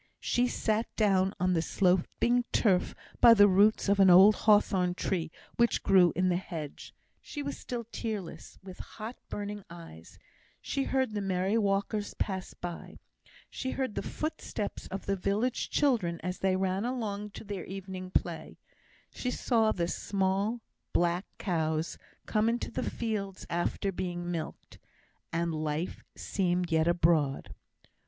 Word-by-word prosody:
She 245 +1 +2
sat 220 -1 0
down 195 -2 +2
on 180 0 +2
the 165 - +2
sloping 190 +8 +2
turf 190 -5 +2 0.2
by 230 -1 +9
the 205 -1 +7
roots 205 +3 +4
of 200 0 +3
an 190 -1 +7
old 190 +4 +9
hawthorn 195 -4 +3
tree 180 -3 -1 0.3
which 235 -1 +2
grew 180 -3 +5
in 185 +2 +2
the 175 - +2
hedge; 160 -6 -7 0.3
she 290 - -6
was 280 0 -3
still 240 -2 -5
tearless 210 -6 -5
with 185 -1 -10
hot 225 +3 -7
burning 205 0 -5
eyes; 165 - -12 0.4
she 275 -1 -2
heard 260 -3 0
the 205 - -2
merry 190 +1 0
walkers 205 0 0
pass 190 -2 -3
by; 175 -1 -7 0.5
she 260 - -5
heard 260 -5 -1
the - - -2
footsteps 310 -9 -4
of 195 - -6
the 200 - 0
village 205 +6 -1
children 220 - +1
as 180 +1 -3
they 190 -1 +2
ran 190 +1 0
along 215 -4 -3
to 205 - -10
their 200 -4 -5
evening 190 -1 -7
play; 170 -3 -2 0.6
she 250 - -3
saw 225 -3 +2
the 170 -4 -1
small 200 +5 -1 0.3
black 175 +3 +1
cows 160 -3 -1 0.3
come 215 +1 +2
into 235 +1 -2
the - - -2
fields 205 -5 -4
after 175 +3 -1
being 175 -1 -4
milked; 165 -2 -6 0.5
and 170 0 -1
life 155 +2 -3
seemed 180 -2 -1
yet 160 0 +3
abroad. 165 -5 +2
195 Hz, 145 wpm, -30 LUFS, 175-215 Hz, 0.6 s, by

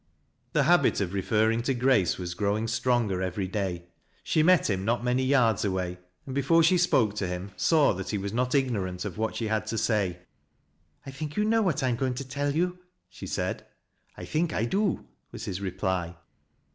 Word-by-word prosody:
The 150 - +3
habit 170 -1 +4
of 95 -2 -2
referring 110 +3 +1
to 130 +2 -1
Grace 120 -9 +2
was 90 -1 -4
growing 105 +4 -1
stronger 115 -4 0
every 95 +1 -2
day. 95 -3 -3 0.4
She 155 - +2
met 180 +2 +4
him 95 -3 -1
not 120 +3 0
many 125 +1 +1
yards 125 -6 +3
away, 90 -2 -2 0.3
and 135 - -6
before 140 +5 +3
she 180 +3 +4
spoke 120 - +3
to 100 - -1
him 90 +2 -5
saw 155 -4 +3
that 95 +1 -6
he 105 - -1
was 100 +1 -4
not 125 +3 0
ignorant 100 -9 -1
of 105 0 -6
what 110 0 -1
she 115 - -2
had 110 0 -1
to 115 - -2
say. 105 -6 0 0.5
" 75 +2 -40
I 135 - -7
think 150 +2 -6
you 210 - +2
know 225 +1 +3
what 180 -10 0
I 130 - +2
am 120 - 0
going 130 0 -1
to 135 +1 -6
tell 145 +2 -2
you," 180 +2 0 0.3
she - - -9
said. - - -2 0.3
" - - -37
I - - -7
think 160 +1 -1
I 110 - 0
do," 195 - 0 0.3
was - - -7
his 95 +1 -4
reply. 95 -2 -2
115 Hz, 210 wpm, -27 LUFS, 95-140 Hz, 0.5 s, habit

